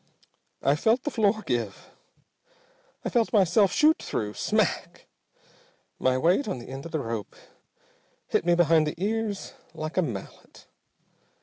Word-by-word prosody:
"I 140 +2 +4
felt 225 - +2
the 295 - -2
floor 215 -2 +1
give, 115 -6 -3 1.2
felt 235 -3 +1
myself 200 -1 +4
shoot 310 +1 +4
through. 105 -1 -3
Smack! - - -1 0.9
My 130 0 +2
weight 180 - +2
on 195 - -2
the 120 - -10
end 135 +4 -7
of - - -13
the 155 - -1
rope 115 -5 -5 0.9
hit - - 0
me 175 0 +3
behind 165 -2 +4
the 150 - -3
ears 210 0 -2 0.2
like 155 +2 -5
a - - +5
mallet. 115 - -7
170 Hz, 135 wpm, -26 LUFS, 130-215 Hz, 1.2 s, a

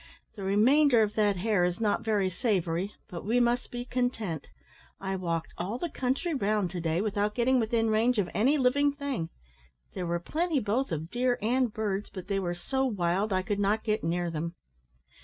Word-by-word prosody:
"The 205 - -8
remainder 235 +6 +4
of 210 -1 -1
that 210 -2 +2
hare 200 -1 +2
is 175 0 0
not 210 -2 +1
very 210 -4 +1
savoury, 185 -2 0 0.2
but 170 - -7
we 230 +5 +2
must 240 0 +1
be 245 0 -5
content; 245 - -2 0.5
I 195 0 -2
walked 170 -3 -3
all 195 +7 -2
the 335 +4 -4
country 270 +7 -1
round 210 - 0
to 180 -2 -4
day, 165 +2 0
without 210 0 0
getting 255 +1 +3
within 225 0 +1
range 230 +3 +3
of 200 -4 +2
any 265 +8 +3
living 285 +2 +3
thing. 280 - -3 0.6
There 180 -2 -3
were 170 0 0
plenty 315 - 0
both 235 +3 -1
of 160 +2 -4
deer 245 +1 +1
and 245 +2 +1
birds, 205 -2 -2
but 185 0 -9
they 195 -1 +1
were 175 -2 -2
so 265 +10 -1
wild 200 -3 0
I 185 -1 +1
could 205 +1 -2
not 205 +2 +1
get 215 -1 0
near 170 +1 -1
them. 165 +2 -4
210 Hz, 195 wpm, -29 LUFS, 185-245 Hz, 0.6 s, remainder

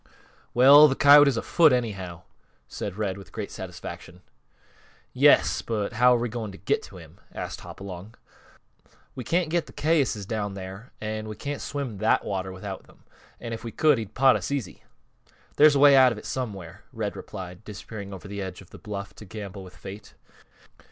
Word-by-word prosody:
"Well, 140 +5 +8
th' 135 - -2
coyote 145 0 +8
is 135 -4 +1
afoot, 160 +6 +4
anyhow," 100 -9 -3 0.4
said 100 -1 -6
Red, 100 -3 -2
with 95 - -14
great - - -6
satisfaction. 90 +2 -9 0.9
"Yes; - - +4
but 105 -3 -3
how 125 0 +5
are - - 0
we 120 - -1
going 110 -2 -5
to - - -11
get 100 - 0
to - - -12
him?" - - -14
asked - - -6
Hopalong. 95 +2 -9 1.0
"We 125 - -6
can't 170 +5 0
get 170 -1 0
th' - - -15
cayuses 145 -10 +1
down 105 -2 -3
here, 95 +4 -9
an' 110 0 -4
we 110 - -6
can't 145 +4 -5
swim 135 -8 -5
that 110 - +2
water 95 -1 -3
without 95 +1 -7
them. - - -22 0.4
And 115 -1 -6
if 115 - -7
we 115 - -6
could, 150 -2 +3
he'd 110 -2 -8
pot 135 0 +5
us - - -3
easy." 135 -10 -4 0.8
"There's 150 0 +7
a - - +2
way 140 0 +7
out 130 -2 +7
of 115 - -5
it - - -10
somewhere," 100 -8 -5
Red 110 -5 -4
replied, 90 -1 -9
disappearing 100 -1 -8
over 95 0 -9
the 100 0 -6
edge 95 -2 -6
of 95 - -16
the - - -12
bluff 100 -1 -7
to 105 - -11
gamble 100 -1 -8
with 90 -1 -14
Fate. 100 +2 -10
110 Hz, 190 wpm, -26 LUFS, 100-130 Hz, 1.0 s, Well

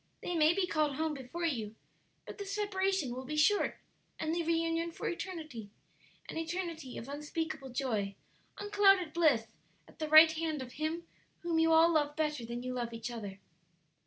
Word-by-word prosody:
They 355 - -2
may 310 -1 +5
be 390 -1 +2
called 305 -5 0
home 315 +1 -1
before 280 +5 -5
you, 225 -9 -2 0.5
but - - -9
the 405 - -4
separation 390 -7 0
will 255 +2 -5
be 300 +4 -4
short 405 +7 +3 0.4
and 315 0 -1
the 340 - 0
reunion 330 0 0
for - - -5
eternity 310 - -5 0.6
an - - -6
eternity 330 -5 -4
of 230 - -7
unspeakable 295 0 -4
joy, 220 -6 -2 0.4
unclouded 390 -5 +3
bliss 300 -10 +3 0.4
at - - -19
the 310 -1 -2
right 315 +1 +9
hand 315 -3 -2
of 250 - -10
Him 315 +4 -3 0.4
whom 335 -2 0
you 325 0 +4
all 325 +1 +6
love 295 -2 +1
better 300 -5 -1
than 235 +1 -5
you 255 0 -3
love 240 -2 -3
each 230 +1 -5
other." 205 -5 -6
315 Hz, 175 wpm, -32 LUFS, 260-335 Hz, 0.6 s, right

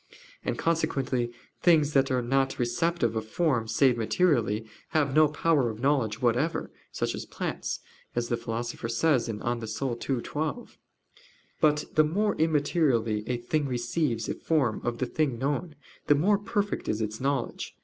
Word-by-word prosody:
And - - -2
consequently 135 -7 0 0.3
things 155 -4 +4
that 135 -1 +3
are 125 -1 +1
not 135 +2 +1
receptive 120 +1 0
of 110 0 -3
forms 115 -6 0
save 130 -3 +4
materially, 115 - +2 0.2
have 150 -4 +1
no 155 +1 +6
power 150 -3 +2
of 110 -1 -6
knowledge 125 -5 +1
whatever 125 +7 +1 0.2
such - - -1
as - - -6
plants, - - -4 0.3
as 120 0 0
the 120 - 0
Philosopher 115 0 -4
says 125 +2 +2
(De 115 - -2
Anima 115 +2 -3
ii, 130 -1 -1
12). 160 +11 -4 0.8
But 150 -1 +3
the 155 - +5
more 200 +7 +1
immaterially 145 -8 +2
a 125 - 0
thing 140 +5 -1
receives 120 -1 -1
the - - -2
form 135 -9 0
of 120 -1 -2
the 130 - 0
thing 135 -1 0
known, 145 +5 -2 0.3
the 145 - +6
more 195 +8 +3
perfect 205 0 -2
is 105 - 0
its 110 +1 -3
knowledge. 135 -2 -2
135 Hz, 160 wpm, -28 LUFS, 120-155 Hz, 0.8 s, no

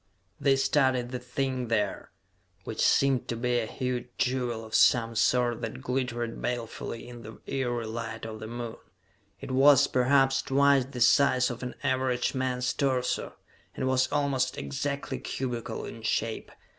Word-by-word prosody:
They 140 -1 +4
studied 130 -3 +2
the 125 - -3
thing 125 0 -2
there, 110 -2 -1 0.5
which - - -4
seemed 135 -3 +3
to 115 - -2
be 120 +1 0
a 110 - -2
huge 125 -1 -3
jewel 125 -3 -1
of 110 - -13
some 115 -1 +4
sort 120 +1 +2
that 115 +2 -5
glittered 120 -3 -2
balefully 115 -1 -4
in 120 -1 -10
the 110 0 -11
eery 120 -4 -2
light 115 0 -5
of 110 -1 -7
the 110 - -7
Moon. 120 0 -6 0.6
It - - -6
was, 140 +1 +6
perhaps, 135 +1 +3
twice 140 -1 +3
the 130 -2 -7
size 125 +1 +4
of 120 - -7
an 125 -1 -5
average 130 -2 0
man's 130 -1 -1
torso, 130 -3 -1 0.4
and 130 - -2
was 130 0 +2
almost 135 -3 0
exactly 140 - -3
cubical 125 -3 -4
in - - -9
shape. - - -2
125 Hz, 155 wpm, -28 LUFS, 120-130 Hz, 0.6 s, was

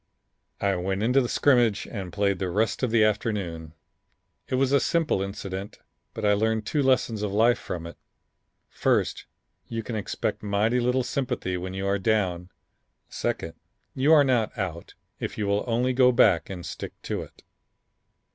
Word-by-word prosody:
I 100 -1 +1
went 95 +3 -2
into 125 +4 +4
the 120 - -2
scrimmage 120 -7 +3
and 95 -5 -6
played 100 0 0
the 95 - -1
rest 105 +5 0
of 125 - +1
the 110 -1 +4
afternoon. 100 -7 -1 0.7
It - - -1
was 130 0 +2
a 140 - +5
simple 160 - +1
incident, 100 0 -5 0.4
but 110 - -3
I 105 - +5
learned 110 +1 0
two 150 +7 0
lessons 130 -5 +2
of 105 -2 -2
life 115 +4 +3
from 85 -2 -5
it: 85 - -9 0.7
first, - - 0 0.4
you 115 -1 -4
can 115 - -5
expect 105 - -3
mighty 105 +4 +1
little 125 +1 +1
sympathy 125 -8 -2
when 90 +1 -5
you 95 +1 -3
are 100 +1 +1
down; 95 -4 0 0.6
second, 80 - -3 0.4
you 135 +4 +2
are 155 -3 +8
not 125 -4 +1
out 85 -5 -5 0.2
if - - -5
you 105 - -1
will 100 +1 +1
only 125 +2 +1
go 125 0 +5
back 100 -8 +4
and 90 -3 -6
stick - - -7
to - - -3
it." - - -13
105 Hz, 170 wpm, -26 LUFS, 95-120 Hz, 0.7 s, are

